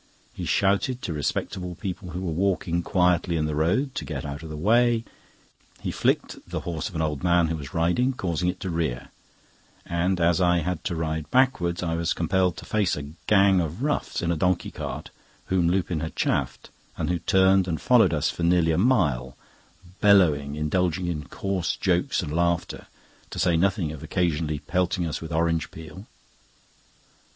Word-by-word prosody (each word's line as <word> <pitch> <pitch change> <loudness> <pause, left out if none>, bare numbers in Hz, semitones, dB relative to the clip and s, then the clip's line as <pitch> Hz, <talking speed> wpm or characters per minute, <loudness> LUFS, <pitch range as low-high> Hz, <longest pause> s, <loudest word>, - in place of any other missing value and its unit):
He - - -5
shouted 100 +6 +1
to 85 - -2
respectable 90 +4 -3
people 90 0 -6
who 90 +1 -5
were 90 -3 -2
walking 85 -1 0
quietly 90 -1 +2
in 75 - 0
the 75 - -2
road 95 - +1
to - - -4
get - - -5
out 70 +2 -5
of 80 - -8
the 75 - -6
way; 115 +6 +3 0.7
he - - -3
flicked - - 0
at - - -17
the - - -3
horse 85 +2 -4
of 90 - -13
an 80 - 0
old 75 -3 -2
man 85 -2 +3
who 80 - -1
was 70 -3 -8
riding, 90 +11 +2
causing 90 -6 -1
it 90 - -4
to 95 - -3
rear; 80 -8 -2 0.8
and, 90 +2 0
as 85 +1 +3
I 90 -1 +3
had 90 +1 -3
to 85 - -1
ride 80 -1 -3
backwards, 105 -10 +2
I 85 -2 -1
was 85 +1 0
compelled 90 0 +1
to - - -9
face 105 -4 +1
a 70 0 -7 0.2
gang 100 -2 +5
of 85 - -4
roughs 150 -9 -1
in 85 - +1
a - - +1
donkey 90 +2 0
cart, - - -6 0.3
whom 90 -3 +2
Lupin 90 -2 0
had 80 +1 -5
chaffed, - - -1 0.3
and - - -2
who 90 - 0
turned 95 -1 +3
and 80 -4 -2
followed - - +4
us - - 0
for - - -8
nearly 85 -1 +3
a 80 - +1
mile, 75 - +1 0.6
bellowing, 80 -9 +4
indulging 90 +3 0
in 80 -4 -3
coarse 95 +1 -2
jokes 90 -2 0
and 75 -3 -5
laughter, 85 0 -1 0.4
to - - -8
say 90 -2 +2
nothing 90 -2 +1
of 75 - -8
occasionally 80 -3 -1
pelting 90 +3 -1
us 80 - -3
with 80 0 -7
orange 80 0 0
peel. 80 +6 -11
85 Hz, 185 wpm, -25 LUFS, 80-95 Hz, 0.8 s, gang